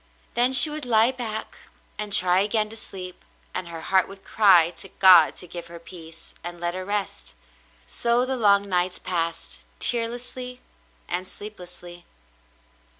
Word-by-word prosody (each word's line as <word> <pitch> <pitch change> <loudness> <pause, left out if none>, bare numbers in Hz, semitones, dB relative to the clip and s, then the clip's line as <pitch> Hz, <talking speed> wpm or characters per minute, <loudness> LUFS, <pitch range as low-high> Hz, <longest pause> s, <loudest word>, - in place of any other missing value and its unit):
Then 245 +2 +2
she 285 +4 +7
would 305 0 -5
lie 225 +1 +4
back 225 -4 -5 0.4
and 210 -1 -5
try 180 -1 +5
again 215 +1 +1
to 225 - -8
sleep, 185 -4 -7 0.3
and 185 -1 -5
her 165 -1 -8
heart 190 +3 +1
would 195 0 -13
cry 180 -6 +4
to 195 - -7
God 180 -5 +6
to - - -4
give 175 0 -8
her 170 0 -11
peace, 165 -1 -10
and 175 0 -7
let 175 0 -2
her 185 +1 -5
rest. 205 0 -3 0.5
So 240 +1 +1
the 265 0 -2
long 200 -4 +3
nights 180 -1 0
passed, 170 -2 -4 0.2
tearlessly 245 +2 -3 0.5
and 180 +1 -3
sleeplessly. 180 -4 -11
195 Hz, 150 wpm, -24 LUFS, 175-225 Hz, 0.5 s, she